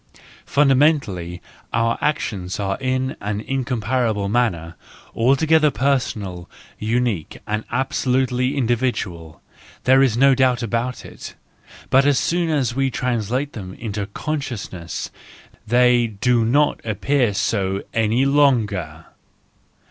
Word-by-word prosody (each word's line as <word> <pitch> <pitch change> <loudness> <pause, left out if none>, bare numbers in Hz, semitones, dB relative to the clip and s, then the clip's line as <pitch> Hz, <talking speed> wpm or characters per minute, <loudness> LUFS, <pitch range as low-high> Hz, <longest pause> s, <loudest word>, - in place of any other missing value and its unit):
Fundamentally 135 - +2 0.3
our 115 0 +1
actions 100 -11 -2
are 95 -1 -1
in 130 0 -1
an 105 0 -2
incom¬ 130 -3 -2
parable 110 -3 0
manner 90 -9 0 0.4
altogether 150 +6 +3
personal, 105 -9 -2 0.3
unique 110 -6 -1
and 105 +1 -2
absolutely 130 0 0
individual—there 120 - -1
is 125 -4 +2
no 135 +2 +6
doubt 130 -2 +2
about 115 +3 -2
it; - - -10 0.6
but 135 +2 +5
as 145 -2 +3
soon 170 +3 0
as 135 -7 0
we 135 +1 +1
translate 125 +2 -2
them 95 -4 -8
into 105 -3 -4
conscious¬ 135 -2 -4
ness, 85 -2 -6 0.6
they 120 0 +4
do 115 +3 +1
not 145 +6 +2
appear 120 +3 +1
so 100 -1 -1
any 115 +4 +2
longer 105 - +1
120 Hz, 110 wpm, -21 LUFS, 105-135 Hz, 0.6 s, no